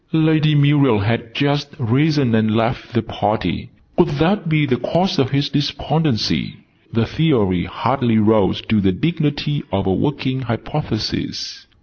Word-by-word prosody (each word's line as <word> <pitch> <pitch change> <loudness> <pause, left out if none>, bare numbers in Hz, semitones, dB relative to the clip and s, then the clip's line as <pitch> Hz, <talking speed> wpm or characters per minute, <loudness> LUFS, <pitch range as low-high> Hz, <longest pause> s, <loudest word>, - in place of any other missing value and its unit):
Lady 155 -1 +3
Muriel 145 -4 +4
had 115 +2 -2
just 145 0 0
risen 135 +1 +1
and 110 -1 +2
left 115 +1 -1
the 115 -2 0
party. 105 -3 -2 0.3
Could 180 - +5
that 175 +3 +1
be 155 -2 +2
the 125 -3 0
cause 180 +8 0
of 135 -2 +2
his 140 +1 0
despondency? 145 -3 -1 0.3
The 115 0 +1
Theory 110 - +1
hardly 120 -2 0
rose 105 -1 +3
to 110 -2 +1
the 95 -1 +2
dignity 150 - -1
of 100 +1 -1
a 95 - +1
Working 130 +2 -1
Hypothesis. 120 0 -4
130 Hz, 140 wpm, -19 LUFS, 110-150 Hz, 0.3 s, Could